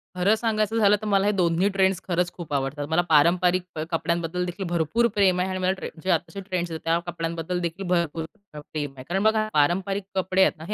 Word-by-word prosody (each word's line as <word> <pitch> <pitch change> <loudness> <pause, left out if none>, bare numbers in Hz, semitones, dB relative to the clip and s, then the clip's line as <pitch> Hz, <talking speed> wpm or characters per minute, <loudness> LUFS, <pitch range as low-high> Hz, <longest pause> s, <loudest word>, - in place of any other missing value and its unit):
खरं 190 +4 +3
सांगायचं 220 -1 0
झालं 210 -2 +5
तर - - -5
मला 200 -1 +2
हे 205 - +3
2ही 180 -1 +2
ट्रेंड्स 190 -1 +2
खरंच 175 -1 0
खूप 170 -4 -8
आवडतात. 140 +1 -1
मला 160 +2 +3
पारंपरिक 175 +4 +4
प - - -4
कपड्यांबद्दल 170 +1 -1
देखील 185 +2 -5
भरपूर 175 +8 +2
प्रेम 190 -3 +3
आहे 185 +1 0
आणि 185 - -3
मला 185 0 +2
ट्रें 190 - -6
जे 190 - -3
आत्ताचे 175 +4 -1
ट्रेंड्स 185 -3 -3
आहेत 160 - -5
त्या 165 +1 +3
कपड्यांबद्दल 170 +1 -3
देखील 175 +3 -4
भरपूर 170 -2 0 0.3
प्रेम 145 -1 -5
आहे. 130 - -8
कारण 190 +3 0
बघा, 220 0 +3
पारंपरिक 190 +7 +1
कपडे 190 0 +1
आहेत 190 - +3
ना, 155 - -10
हे 210 - -3
180 Hz, 220 wpm, -25 LUFS, 165-195 Hz, 0.3 s, झालं